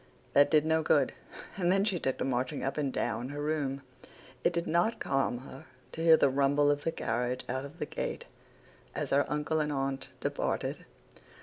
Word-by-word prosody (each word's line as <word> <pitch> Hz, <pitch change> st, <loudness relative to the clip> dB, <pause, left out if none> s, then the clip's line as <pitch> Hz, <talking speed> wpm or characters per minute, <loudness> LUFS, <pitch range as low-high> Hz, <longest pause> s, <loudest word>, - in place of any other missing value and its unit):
That 145 Hz, 0 st, +6 dB
did 155 Hz, -1 st, +4 dB
no 160 Hz, 0 st, +2 dB
good, -, -, +3 dB, 0.4 s
and 180 Hz, -2 st, +2 dB
then 195 Hz, +1 st, +3 dB
she 195 Hz, -5 st, 0 dB
took 130 Hz, -3 st, -1 dB
to -, -, -2 dB
marching 125 Hz, -1 st, -1 dB
up 135 Hz, -, -1 dB
and 145 Hz, -3 st, -1 dB
down 125 Hz, 0 st, -2 dB
her 145 Hz, +1 st, -6 dB
room. 145 Hz, -3 st, -1 dB, 0.6 s
It -, -, +4 dB
did 170 Hz, 0 st, -1 dB
not 175 Hz, +8 st, +1 dB
calm 135 Hz, -2 st, 0 dB
her 135 Hz, 0 st, -11 dB, 0.3 s
to 160 Hz, -, -6 dB
hear 165 Hz, -1 st, +7 dB
the -, -, +4 dB
rumble 140 Hz, +2 st, +3 dB
of 145 Hz, 0 st, -1 dB
the 165 Hz, -, 0 dB
carriage 125 Hz, -1 st, -2 dB
out 130 Hz, +2 st, -2 dB
of 145 Hz, +4 st, -11 dB
the 150 Hz, -, -2 dB
gate -, -, -4 dB, 0.7 s
as -, -, -3 dB
her 140 Hz, +1 st, +3 dB
uncle 150 Hz, +1 st, 0 dB
and 150 Hz, -1 st, 0 dB
aunt 135 Hz, -1 st, -2 dB
departed. -, -, -2 dB
145 Hz, 195 wpm, -30 LUFS, 135-160 Hz, 0.7 s, hear